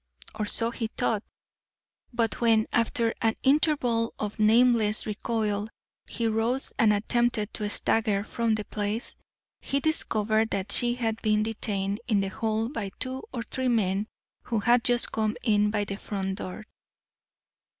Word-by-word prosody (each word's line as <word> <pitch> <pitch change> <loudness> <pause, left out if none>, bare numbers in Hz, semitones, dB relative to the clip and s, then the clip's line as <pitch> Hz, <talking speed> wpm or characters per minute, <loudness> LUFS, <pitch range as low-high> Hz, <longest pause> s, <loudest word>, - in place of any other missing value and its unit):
Or 215 -1 -3
so 230 +2 +1
he 230 -1 -3
thought. 220 -1 -1 0.9
But 235 -2 -1
when, 225 -2 +4
after 230 0 +1
an 225 -1 +2
interval 265 -5 +2
of 210 +1 -5
nameless 220 -1 +4
recoil, 210 -1 -2 0.4
he 235 - -2
rose 225 +4 -1
and 225 -4 +5
attempted 220 +1 0
to 210 -1 -2
stagger 210 -1 +2
from 230 0 0
the 210 -1 -4
place, 210 +2 -4 0.4
he 275 - -1
discovered 220 -7 +1
that 200 -1 -2
she 240 +2 +3
had 225 -2 -2
been 215 -1 +2
detained 205 -2 -2
in 215 -5 +2
the 195 0 -1
hall 220 +2 -1
by 225 -7 -4
two 260 +1 -2
or 240 -3 -4
three 260 +2 -3
men 205 -3 +1 0.3
who 230 - -2
had 235 +3 +3
just 245 0 +2
come 220 +1 -1
in 210 -2 +3
by 210 -1 0
the 195 -1 -5
front 195 -2 -4
door. 215 +4 -7
220 Hz, 150 wpm, -27 LUFS, 210-235 Hz, 0.9 s, and